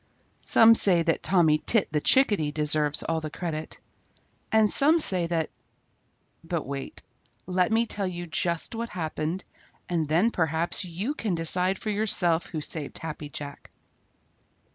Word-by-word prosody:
Some 225 0 +6
say 180 -6 +2
that 165 -1 -1
Tommy 160 -5 +2
Tit 225 +3 +2
the 150 - -1
Chickadee 205 - +2
deserves 150 -1 +2
all 165 -1 -2
the 155 - -6
credit, 160 -1 -6 0.7
and 220 -1 +4
some 300 +9 +6
say 185 - +3
that 165 -2 -2 0.9
but 165 -2 -4
wait. 135 0 -7 0.4
Let 180 +2 0
me 225 +1 +2
tell 200 -3 -1
you 175 -1 -6
just 170 +4 -2
what 230 +1 -5
happened, 165 +1 -4 0.4
and 165 -3 -2
then 175 +10 +1
perhaps 160 +1 -2
you 185 - -4
can 215 - -3
decide 180 +3 +2
for 215 - -4
yourself 180 -5 +2
who 155 - -6
saved 150 -1 -2
Happy 155 -2 -7
Jack. 145 0 -8
170 Hz, 145 wpm, -25 LUFS, 155-200 Hz, 0.9 s, Some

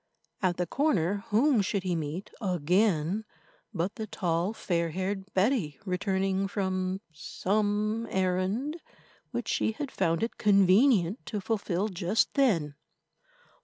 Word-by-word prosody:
At 185 -3 +1
the 180 - 0
corner 200 - 0
whom 240 +2 +3
should 195 0 -1
he 180 -2 0
meet 160 +5 -4
again 180 +1 +1 0.5
but 185 -1 -2
the 220 -1 -4
tall, 175 -1 -1
fair 170 -6 -1
haired 190 +3 -3
Betty, 190 - +1
returning 190 0 0
from 190 -1 -2
some 210 +6 -1
errand 190 - -1 0.5
which - - -4
she 220 - +1
had 280 +3 -5
found 165 0 0
it 230 - -3
convenient 200 0 +4
to 210 - -2
fulfil 200 -2 -1
just 185 +1 0
then. 185 - +2
195 Hz, 125 wpm, -29 LUFS, 180-215 Hz, 0.5 s, convenient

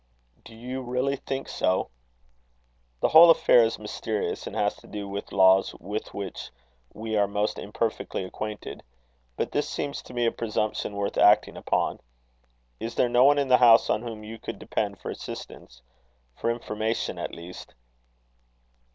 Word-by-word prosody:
"Do 115 - -13
you 125 +3 -5
really 125 +2 -1
think 135 0 -5
so?" 95 -7 0 1.1
"The - - +3
whole 165 +2 +9
affair 125 -6 +6
is 115 - 0
mysterious, 105 0 -4
and - - -7
has - - +1
to - - -17
do 105 -1 -6
with 100 +1 -6
laws 95 0 +4
with 105 +4 -6
which 100 -1 -6 0.4
we 110 0 -4
are 100 -1 +3
most 105 +1 -1
imperfectly 105 -1 -3
acquainted; 105 +3 -6 0.5
but - - -2
this - - -1
seems 140 -1 -4
to 125 - -13
me 120 -1 +1
a 115 - +3
presumption 110 -2 -2
worth 100 0 -2
acting 105 +1 +5
upon. - - -1 0.8
Is 115 +1 -5
there 125 - +2
no 120 +2 +5
one 145 +1 +6
in 140 -2 0
the 125 - +7
house 115 -2 +6
on 105 - +1
whom 115 -3 -7
you 110 +1 -9
could - - -6
depend - - -3
for - - -5
assistance - - -9 0.5
for 115 - -2
information, 110 -1 -2
at - - -5
least?" 85 +2 -11
110 Hz, 160 wpm, -26 LUFS, 105-120 Hz, 1.1 s, whole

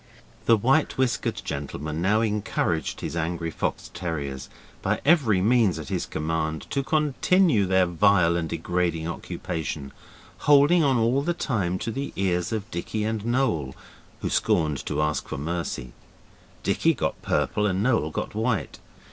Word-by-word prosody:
The 115 - +6
white 135 +8 +2
whiskered 130 -3 0
gentleman 75 +2 -4
now 105 +5 +3
encouraged 105 -7 -1
his - - -4
angry 85 0 -2
fox - - -3
terriers, 75 -7 -4 0.3
by - - 0
every 135 - +4
means 110 -2 +3
at - - -7
his - - -2
command, 80 0 -2
to 140 - +1
continue 150 - +2
their 95 0 +4
vile 90 -1 +3
and 85 -2 -2
degrading 85 -1 -1
occupation; 80 -4 -5 0.5
holding 145 +4 +5
on 135 -3 +3
all 120 +4 +2
the 170 +4 -1
time 100 - -1
to 115 - -3
the 135 +5 -4
ears 90 -2 0
of 110 0 -4
Dicky 105 +5 -3
and 110 -1 -2
Noel, 100 - 0 0.5
who - - -1
scorned 75 -5 +1
to 75 - 0
ask 75 0 -1
for - - -5
mercy. 75 -5 -4 0.7
Dicky - - +2
got - - -2
purple 105 0 +1
and 95 +1 0
Noel 115 -10 +2
got - - -4
white. 110 0 -1
95 Hz, 150 wpm, -25 LUFS, 80-120 Hz, 0.7 s, The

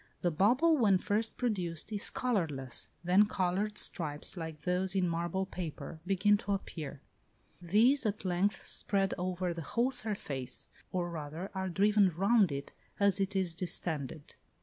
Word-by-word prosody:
The 175 - +1
bubble 250 - +4
when 205 -7 +4
first 210 +4 -1
produced 185 -7 -2
is 205 -1 +1
colourless; 155 - -1 0.2
then 185 +4 +5
coloured 200 +2 -1
stripes, 150 -2 0
like 160 -3 -6
those 185 +1 0
in 185 -2 +2
marble 170 +3 -1
paper, 165 -4 -6
begin 200 +2 +3
to 200 0 -2
appear: 160 -7 -6 0.6
these 225 +11 +4
at 210 -1 -3
length 185 +3 0
spread 195 -1 +1
over 180 0 -2
the 165 - -6
whole 235 - 0
surface, 175 - -2 0.2
or 175 -2 -2
rather 160 +4 -6
are 190 -1 -2
driven 200 +2 +4
round 195 +2 +3
it 140 0 -5 0.3
as 200 -1 +3
it 195 +1 -1
is 185 -3 +1
distended. 160 -4 -2
185 Hz, 150 wpm, -32 LUFS, 165-205 Hz, 0.6 s, then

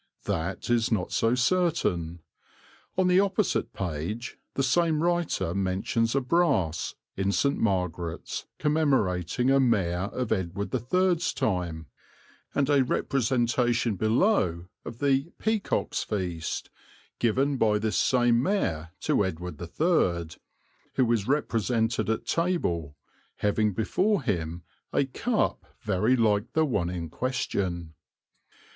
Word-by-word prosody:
That 85 +8 -2
is 115 -1 +2
not 105 -5 0
so 115 +2 +2
certain. 125 - 0 0.8
On 185 -1 +3
the 180 +1 +5
opposite 200 0 +1
page 95 - -4 0.2
the 135 - +1
same 160 +3 +2
writer 170 - 0
mentions 100 +5 0
a 140 - +3
brass 125 - +1 0.2
in 95 +1 0
St. 140 +7 +2
Margaret's 90 -5 -2
commemorating 130 - +1
a 135 - +5
Mayor 95 -7 +1
of 125 -1 -3
Edward 95 +1 -2
III's 175 - +1
time, 85 -5 -2 0.7
and 140 -1 +2
a 140 -2 +4
representation 120 -3 +1
below 110 - +2 0.2
of 115 - -8
the 135 0 +2
"Peacock's 220 -2 -1
Feast" 90 -6 -3 0.5
given 135 +4 +1
by 105 -3 +3
this 110 0 -1
same 120 -2 +3
mayor 85 - -1
to - - +2
Edward 90 -3 -5
III, 85 - 0 0.6
who 125 -3 +3
is 110 -4 +1
represented 115 -5 0
at 110 - -1
table, 90 - -1 0.4
having 105 +1 +1
before 185 - +1
him 85 -6 -2 0.3
a 140 - +2
cup 220 - -1 0.2
very 105 +4 +2
like 110 -3 +1
the 160 0 +3
one 100 - 0
in 85 -2 -4
question. 90 -6 -2
115 Hz, 120 wpm, -27 LUFS, 90-140 Hz, 0.8 s, the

